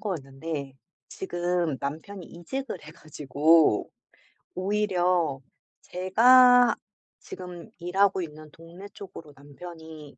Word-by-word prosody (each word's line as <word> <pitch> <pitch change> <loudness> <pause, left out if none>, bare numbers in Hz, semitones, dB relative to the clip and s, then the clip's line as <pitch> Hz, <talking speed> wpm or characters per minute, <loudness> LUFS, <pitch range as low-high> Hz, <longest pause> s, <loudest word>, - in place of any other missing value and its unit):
거였는데 140 -5 -5 0.3
지금 175 -4 -2
남편이 160 +7 -6
이직을 195 +5 -6
해 155 - -11
가지고 155 -3 +2 0.7
오히려 185 -6 0 0.4
제가 245 +6 +5 0.4
지금 180 -2 -10
일하고 190 +2 +1
있는 155 -1 -9
동네 170 +5 -12
쪽으로 185 -6 -11
남편이 155 0 -12
175 Hz, 210 characters per minute, -26 LUFS, 155-190 Hz, 0.7 s, 제가